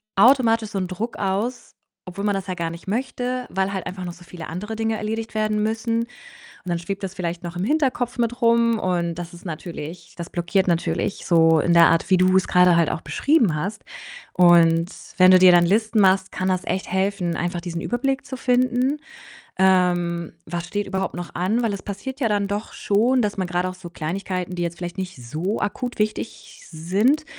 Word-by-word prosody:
automatisch 230 -1 +4
so 205 - -4
'n 185 - -2
Druck 205 +6 -5
aus, 205 +6 -2 0.3
obwohl 190 +3 -5
man 205 - +2
das 195 -1 -3
ja 185 - -3
gar 170 -2 -3
nicht 170 +3 -11
möchte, 250 +3 -2
weil 190 +1 -1
halt 190 -2 -4
einfach 185 0 -6
noch 175 - -4
so 175 +1 -14
viele 170 -2 -9
andere 210 +7 -5
Dinge 225 0 -1
erledigt 220 +1 -4
werden 215 -1 0
müssen 225 +1 0
und 230 - -4 0.6
dann 175 -1 -1
schwebt 195 +4 -5
das 190 -1 -5
vielleicht 175 -1 -4
noch 175 0 -6
im 180 - -2
Hinterkopf 255 -2 0
mit 240 +1 0
rum 230 0 +4
und 175 -3 -1
das 175 0 -7
ist 175 +2 -13
natürlich 165 0 -7
das 170 -1 -7
blockiert 180 +2 0
natürlich 175 +3 -1
so 165 -2 +5
in 170 +3 +2
der 170 0 +7
Art, 165 - +1
wie 185 - +6
du's 185 +1 +3
grade 180 -1 +5
halt 170 -2 +3
auch - - -4
beschrieben 260 - +2
hast 195 +7 -4 0.5
und 170 -1 +5 0.3
wenn 185 0 +7
du 185 - +7
dir 185 0 +8
dann 175 -1 +5
Listen 215 +4 +2
machst, 190 0 +3
kann 185 - -2
das 185 0 0
echt 190 - -2
helfen, 190 -2 0
einfach 175 0 -2
diesen 170 -1 -5
Überblick 270 +5 -1
zu 260 - -6
finden. 255 +3 +1 0.6
Ähm, 175 -3 +2
was 170 +1 -4
steht 205 +3 -3
überhaupt 190 0 -2
noch 175 0 -7
an? 200 +7 0
Weil 225 -3 0
es 200 - -5
passiert 265 +7 -6
ja 235 - +2
dann 205 -1 +1
doch 205 +2 -4
schon, 240 +5 +2
dass 210 -1 -1
man 190 - 0
grad 175 +1 -1
auch 185 - -4
so 185 -1 -10
Kleinigkeiten, 180 +2 -4
die 175 - -3
jetzt 170 0 -3
vielleicht 175 0 -6
nicht 185 -1 -4
so 155 - -3
akut 245 +4 -3
wichtig 215 +1 -4
sind, 200 - +1
190 Hz, 205 wpm, -22 LUFS, 175-220 Hz, 0.6 s, dir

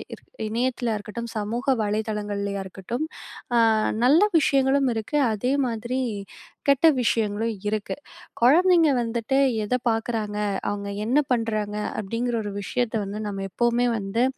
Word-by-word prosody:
இரு - - -23 0.3
இணையத்திலயா 240 -1 -1
இருக்கட்டும், 230 +3 -6
சமூக 230 +5 -3 0.2
வலைதளங்கள்லயா 205 -1 -2
இருக்கட்டும், 205 - -4 0.5
அ - - +5 0.5
நல்ல 305 +8 +6 0.2
விஷயங்களும் 275 -1 +3
இருக்கு, 220 +7 -2 0.2
அதே 250 +6 0
மாதிரி 240 +3 -3 0.7
கெட்ட 280 +4 +5
விஷயங்களும் 225 0 0
இருக்கு. 210 -1 -2 0.5
குழந்தைங்க 335 +5 +5
வந்துட்டு 235 +3 -1 0.3
எதை 250 +4 0
பார்க்குறாங்க, 225 -2 -2 0.3
அவுங்க 200 0 -4 0.2
என்ன 260 +6 +3
பண்றாங்க 215 -3 0 0.2
அப்பிடிங்கிற 230 +4 -2
ஒரு 205 - -4
விஷயத்த 240 +2 -2
வந்து 200 +2 -5
நம்ம 195 -1 -4
எப்பவுமே 240 +4 +1
வந்து, 205 +4 -1
230 Hz, 120 wpm, -24 LUFS, 210-250 Hz, 0.7 s, நல்ல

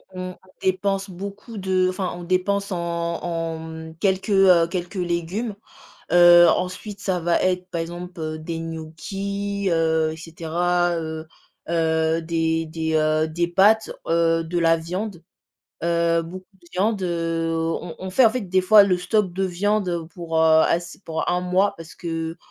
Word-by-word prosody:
on 185 0 -6 0.2
dépense 195 +1 0
beaucoup 200 +5 -8
de 185 -1 +1
enfin 185 0 -2
on 175 - -8
dépense 195 +3 0
en 180 - -1 0.4
en 165 -1 -3
mmh, 160 0 -8
quelques, 190 +1 0
heu, 185 -4 +5
quelques 175 +2 -4
légumes, 180 +5 -2 0.6
heu, 175 0 +8
ensuite 185 +4 -2
ça 190 -3 -1
va 170 0 +1
être 180 0 0
par 170 - -2
exemple, 175 +1 -7
heu, 155 0 -4
des 165 +1 -5
gnocchis, 195 +5 -4
heu, 160 -1 +2
et - - -8
cetera, 170 +2 -1
heu 160 0 -5 0.4
heu, 160 -1 +1
des 165 0 0
des 160 0 -3
heu, 155 0 +2
des 170 +2 -1
pâtes, 205 +5 +4 0.2
heu, 165 0 +2
de 175 +2 -2
la 165 -1 +4
viande, 180 +2 -5 0.6
heu, 170 0 +2
beaucoup 185 +3 -9 0.2
de 170 - -20
viande, 205 +2 0
heu, 165 -1 -1
on 165 +1 -3
on 190 - -5
fait 240 +7 +5
en - - +7
fait 255 +3 -3
des 185 -1 +1
fois 205 +3 +7
le 190 -2 +2
stock 185 +2 0
de 190 +2 -1
viande, 195 +2 0
heu, 170 -2 -3
pour, 165 -2 -5
heu, 160 0 +6
ass 170 +1 -1
pour 160 -1 -2
un 180 0 +1
mois 190 +3 +1
parce 165 0 -11
que, 165 -1 -4
175 Hz, 170 wpm, -23 LUFS, 165-190 Hz, 0.6 s, heu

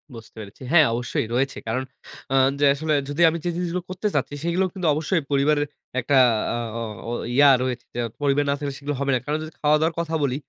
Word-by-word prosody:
বুঝতে 115 0 -12
পেরেছি। 100 +4 -11
হ্যাঁ 160 -4 +7
অবশ্যই 120 -1 -2
রয়েছে। 135 +2 0
কারণ 130 +4 -1 0.5
আ - - +2 0.2
যে 145 - +4
আসলে 155 +2 -1 0.2
যদি 145 +4 -2
আমি 165 - -3
যে - - +1
জিনিসগুলো 175 0 -2
করতে 190 +3 -2
চাচ্ছি - - -1
সেগুলোও 180 +3 +1
কিন্তু 185 -4 -2
অবশ্যই 160 +3 0
পরিবারের 145 +1 +2 0.3
একটা 135 +3 0 0.4
আ - - -2 0.2
অ - - -4 0.3
ও - - -3 0.2
ইয়া 145 0 +7
রয়েছে 125 -1 -3
যে, - - -3 0.2
পরিবার 145 0 +2
না - - +3
থাকলে 140 -2 -4
সেগুলো 145 0 -3
হবে 140 0 0
না। - - +1
কারণ 150 +1 -1
যদি 155 - -8
খাওয়া-দাওয়ার 155 +2 +2
কথা 165 -1 -2
বলি, 130 -2 0
145 Hz, 210 wpm, -23 LUFS, 135-165 Hz, 0.5 s, হ্যাঁ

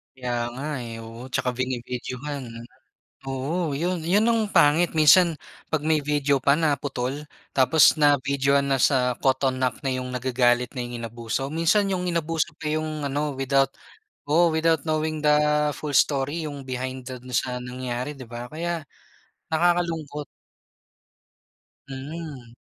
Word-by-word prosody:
Kaya 125 -1 -4 0.2
nga 135 +4 -6 0.2
eh 115 0 -7
oo 115 +2 -9
saka 125 - +1
bini-videohan. 125 +2 -4 0.8
Oo 145 +3 -2
yun 175 +3 -1
yun 190 +7 +2
ang 230 -1 +3
pangit 165 +1 +4
minsan, 165 +2 +6 0.3
pag 155 -1 -1
may 155 -1 +3
video 145 -1 +1
pa 140 +2 +4
na 160 -3 +2
putol, 140 +2 -4 0.2
tapos 135 +4 +5
na 145 -1 +6
videohan 140 0 +2
na 135 - +1
sa 125 -3 +3
caught 135 0 +2
on 130 -1 0
act 130 +1 -1
na 135 - 0
yung 130 0 -3
nagagalit 125 -1 +1
na 130 - -5
yung 120 0 -5
inabuso, 120 +5 -4
minsan 195 +5 +2
yung 180 -1 -1
inabuso 165 -3 -1
pa 155 - -7
yung 155 -1 -2
ano 145 0 -2
without 135 0 +1 0.5
oo, 165 +2 +4
without 160 -2 +2
knowing 155 -1 -1
the 150 - +5 0.5
full 145 -3 -3
story 145 +3 +2
yung 145 -3 -7
behind 130 0 -4
dun 125 0 -8
sa 125 +1 0
nangyari 125 +1 -4
di 130 -5 -10
ba? 120 +2 -8
Kaya 170 0 -3 0.7
nakakalungkot. 160 -3 0 1.6
Mm. 135 -3 -7
140 Hz, 145 wpm, -25 LUFS, 130-155 Hz, 1.6 s, minsan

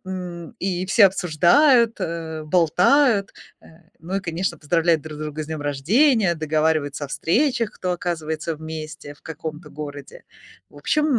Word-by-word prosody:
м, 175 -3 -7
и 185 -1 -2
все 200 +3 +5
обсуждают, 220 - +4
э, 160 -1 -4
болтают. 195 - +3 0.3
Э, - - -19 0.3
ну 180 +4 -4
и, 195 - -1
конечно, 175 +1 -3
поздравляют 165 +1 +1
друг 155 -1 -8
друга 155 0 -5
с - - -8
днем 160 -1 -5
рождения, 190 - +2
договариваются 155 -2 0
о - - -7
встречах, 230 - 0
кто 180 -1 -3
оказывается 160 -2 -3
вместе 155 -2 -8
в - - -21
каком-то 160 0 -7
городе. 145 -1 -9 0.5
В - - -19
общем, 300 - +1
165 Hz, 145 wpm, -22 LUFS, 155-190 Hz, 0.5 s, все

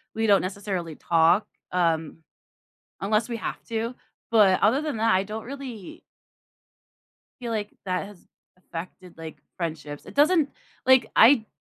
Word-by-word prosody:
we 225 0 0
don't 200 -2 +5
necessarily 185 -4 -4
talk, 170 +4 +3 0.2
um, 165 -3 0 0.8
unless 215 +3 +1
we 235 - -3
have - - -5
to, 230 +2 -2 0.4
but 205 -5 +5
other 225 +7 +4
than 305 -5 -3
that, 225 -4 +3
I 190 - +3
don't 215 +2 -6
really 250 -7 -8 1.4
feel 235 -2 -4
like 210 -2 -2
that 185 +1 -2
has 205 -3 -13 0.4
affected, 180 +1 -9
like, 160 -1 -8 0.2
friendships, 155 -4 -5
it - - -11
doesn't 300 0 +4 0.4
like, 260 -1 +5
I 230 -1 +6
205 Hz, 140 wpm, -25 LUFS, 180-230 Hz, 1.4 s, I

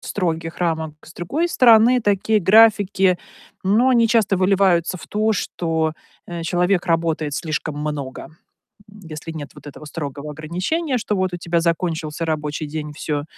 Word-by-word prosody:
строгих 165 -3 -3
рамок. 160 -3 -1
С 160 - -14
другой 290 - -2
стороны, 240 -3 +5
такие 205 +1 +2
графики, 200 -2 +4 0.5
ну, 215 +7 +3
они 235 -3 +4
часто 220 -4 +2
выливаются 185 -2 +2
в - - -11
то, 215 +1 0
что, 160 -5 -1 0.3
э, 170 -1 -6
человек 180 +2 +1
работает 165 -3 0
слишком 155 -2 -3
много. 150 -1 -5 0.6
М, 210 - -15
если 155 +1 -7
нет 150 -4 -7
вот - - -14
этого 145 +1 -10
строгого 150 -1 -6
ограничения, 185 - -2
что 210 -2 -2
вот 185 -1 -1
у - - -3
тебя 170 0 0
закончился 165 -1 -2
рабочий 150 -1 -3
день, 150 0 -5
всё, 145 -1 -3
170 Hz, 155 wpm, -21 LUFS, 155-205 Hz, 0.6 s, стороны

